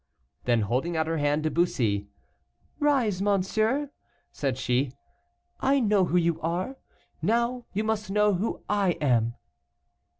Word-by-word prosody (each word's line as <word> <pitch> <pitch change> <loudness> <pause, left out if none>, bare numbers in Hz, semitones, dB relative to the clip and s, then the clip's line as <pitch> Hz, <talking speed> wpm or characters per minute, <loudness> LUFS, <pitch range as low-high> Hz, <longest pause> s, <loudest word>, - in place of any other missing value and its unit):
Then 120 -2 +3
holding 130 - -1
out 160 - +1
her 165 0 -1
hand 145 +1 +1
to 155 - 0
Bussy. 110 - +1 0.7
"Rise, 260 - +2
monsieur," 215 +8 +1 0.4
said 135 -3 -2
she, 130 +1 +1 0.7
"I 275 +1 +3
know 210 -5 +3
who 180 - +1
you 170 -2 +1
are, 180 +11 -2 0.4
now 235 +6 0
you 210 +2 -1
must 215 -2 -1
know 210 +1 +3
who 195 +5 -2
I 200 -3 +2
am." 120 -6 +1
180 Hz, 135 wpm, -27 LUFS, 145-215 Hz, 0.7 s, Then